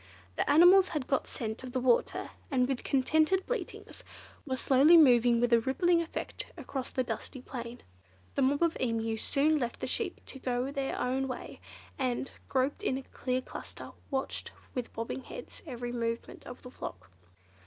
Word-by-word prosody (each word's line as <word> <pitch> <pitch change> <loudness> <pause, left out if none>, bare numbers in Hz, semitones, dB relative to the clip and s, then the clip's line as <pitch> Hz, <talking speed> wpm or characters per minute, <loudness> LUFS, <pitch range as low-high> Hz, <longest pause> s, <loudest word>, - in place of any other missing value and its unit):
The - - 0
animals 360 +5 +8
had 270 - -3
got 270 - 0
scent 220 -1 -4
of 255 -1 -8
the 260 - +1
water, 250 -1 +1 0.2
and 250 -3 +2
with 265 -2 -2
contented 315 +7 +2
bleatings - - -5 0.4
were 260 - 0
slowly 275 +6 +6
moving 245 -5 +6
with 240 0 +2
a 235 - +7
rippling 335 +8 +2
effect 335 - -5
across 265 -4 -5
the 255 - 0
dusty 260 - -5
plain. 240 -1 -7 0.5
The - - 0
mob 285 +4 +3
of 335 -1 +2
Emu 225 -2 0
soon 300 +6 +2
left 240 -3 -3
the - - -3
sheep - - -2
to 270 - -10
go 250 +1 -1
their 275 -1 -2
own 260 +2 0
way, 255 - -7 0.4
and, 255 0 -1 0.2
grouped 270 +7 +1
in 265 -11 0
a 270 - -6 0.4
cluster, - - -8 0.2
watched, 270 -2 -3 0.2
with 250 -2 -4
bobbing 230 +3 -4
heads, - - -9
every 245 -3 -4
movement 230 -1 -4
of 245 - -9
the 250 - -10
flock. 95 - -8
260 Hz, 170 wpm, -31 LUFS, 245-285 Hz, 0.5 s, animals